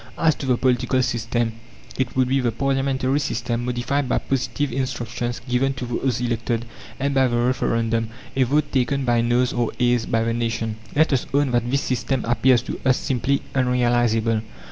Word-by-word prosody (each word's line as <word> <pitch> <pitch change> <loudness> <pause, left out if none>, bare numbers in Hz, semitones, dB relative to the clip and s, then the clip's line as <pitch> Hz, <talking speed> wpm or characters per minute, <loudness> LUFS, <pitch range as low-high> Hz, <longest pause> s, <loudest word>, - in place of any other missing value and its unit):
As 160 -1 +3
to 135 - -6
the 125 -2 +3
political 130 +1 +2
system, 115 -1 -1 0.4
it 130 -2 -2
would 130 -1 +3
be 135 +2 +2
the 120 -2 +1
Parliamentary 135 +2 0
system, 120 -3 -2
modified 125 +3 -1
by - - +2
positive 130 +1 -1
instructions 120 -2 -3
given 130 +2 +1
to 130 - -5
those 120 0 -1
elected, 120 -1 -1 0.3
and 140 +1 0
by 135 -1 +4
the 120 -1 0
Referendum 115 -2 0 0.3
a 135 - +1
vote, 145 +4 +2
taken 135 +1 +1
by 120 -1 +3
noes 120 +1 +2
or 120 -2 0
ayes 120 -2 +2
by 115 0 +1
the 115 0 0
nation. 115 -1 -2 0.2
Let 155 0 +3
us 130 - 0
own 140 -2 +2
that 120 0 +1
this 140 +2 +1
system 130 0 -1
appears 120 +1 +3
to - - -5
us 130 -2 +3
simply 135 +2 0
unrealizable. 120 -3 +2
125 Hz, 180 wpm, -22 LUFS, 120-135 Hz, 0.4 s, by